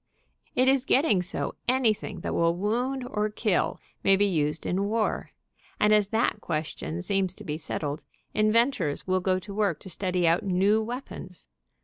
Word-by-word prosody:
It 255 +1 +3
is 265 -1 +4
getting 265 - +3
so 180 - -1
anything 220 -7 +1
that - - -3
will 170 0 +2
wound 245 +7 -1
or 210 -3 -1
kill 210 -3 0 0.2
may 195 - +5
be 205 +1 +3
used 155 -5 0
in 190 +2 0
war, 220 +1 -1 0.5
and 210 0 +4
as 210 -2 +4
that 220 0 0
question 160 +2 -4
seems 190 -1 0
to - - -11
be 150 - -3
settled, 150 -2 -4 0.3
inventors 215 - +2
will 185 0 +1
go 185 0 +1
to 195 +2 -8
work 200 -5 0
to 190 - -8
study 180 -1 0
out 165 +2 +3
new 200 +3 +2
weapons. 225 -6 -7
200 Hz, 165 wpm, -27 LUFS, 180-220 Hz, 0.5 s, may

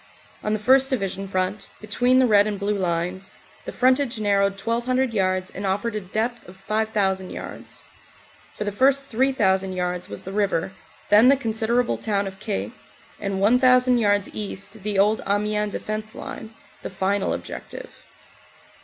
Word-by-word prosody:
On 210 - -2
the - - +1
1st. 260 +5 +4
Division 195 -6 -2
front, 185 +2 -2
between 245 +4 +2
the 260 - +5
Red 205 -3 +5
and 205 -2 -3
Blue 205 +1 0
Lines, 180 +1 -2 0.4
the - - -5
frontage 255 -1 +2
narrowed 200 -1 +1
to 195 - -12
1,200 245 +2 0
yards 185 -2 0
and 195 - -7
offered 205 +4 -1
a 215 - -2
depth 225 +5 -3
of 190 - -14
5,000 200 -2 -1
yards. - - -9 0.7
For - - -2
the 205 - -2
first 275 +6 +3
3,000 210 -7 +1
yards 180 -1 -3
was 100 - -8
the 190 - -7
river, 195 -3 0 0.4
then 210 +4 +7
the 275 +1 +6
considerable 230 0 0
town 200 -2 0
of 190 0 -8
Caix, 210 -1 -3 0.5
and 195 -2 -2
1,000 250 +3 +4
yards 205 -2 +2
east 205 0 -6
the 205 0 -2
old 210 +3 +3
Amiens 210 +1 0
Defense 215 0 -5
Line, 225 0 -8 0.3
the - - -5
final 195 +1 -1
objective. - - -7
210 Hz, 160 wpm, -23 LUFS, 195-235 Hz, 0.7 s, then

